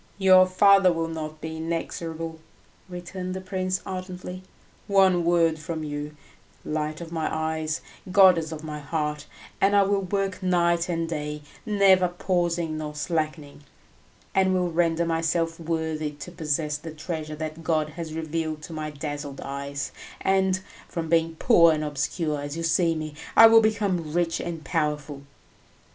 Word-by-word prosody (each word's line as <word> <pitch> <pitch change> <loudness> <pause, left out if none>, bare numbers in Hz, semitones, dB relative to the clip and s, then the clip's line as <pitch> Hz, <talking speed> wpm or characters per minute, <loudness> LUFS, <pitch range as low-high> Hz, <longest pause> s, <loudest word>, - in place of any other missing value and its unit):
"Your 185 -1 +6
father 195 0 +6
will 165 -1 -2
not 155 -1 -6
be 160 0 -5
inexorable," 165 0 -4 0.5
returned 180 +1 -6
the - - -3
prince 185 0 -2
ardently; 185 -1 -6 0.5
"one 190 -3 +4
word 165 -2 +3
from 160 0 -4
you, 150 0 -5 0.5
light 155 +1 -2
of 165 -1 -8
my 160 -2 -1
eyes, 160 0 -2 0.3
goddess 180 -5 +6
of 155 -1 -7
my 150 -1 -5
heart, 150 0 -3 0.3
and 200 +1 +4
I 200 - +6
will 200 0 +1
work 195 0 -2
night 175 -1 +2
and 165 -1 -1
day, 150 -2 -4 0.2
never 195 -3 +5
pausing 175 -3 -1
nor 150 -1 -5
slackening, 155 -1 -3 0.7
and 190 -1 +3
will 180 -1 0
render 165 0 +2
myself 165 0 0
worthy 160 -2 -2
to 150 +4 -9
possess 150 -3 -1
the 160 +2 -8
treasure 155 -1 -5
that 155 +1 -6
God 155 -2 +1
has 160 0 -7
revealed 160 -1 -3
to 165 - -8
my 155 -1 -4
dazzled 145 -1 -6
eyes, 140 0 -4 0.3
and, 190 -1 +2 0.3
from 165 -2 -4
being 165 0 +2
poor 170 -3 +6
and 155 0 -2
obscure 150 +1 -2
as 145 +2 -5
you 165 - -3
see 165 0 +2
me, 155 -1 -5 0.2
I 225 - +11
will 225 0 +8
become 200 -7 0
rich 170 -1 +1
and 165 -3 -5
powerful." 150 -3 -2
165 Hz, 155 wpm, -25 LUFS, 155-180 Hz, 0.7 s, I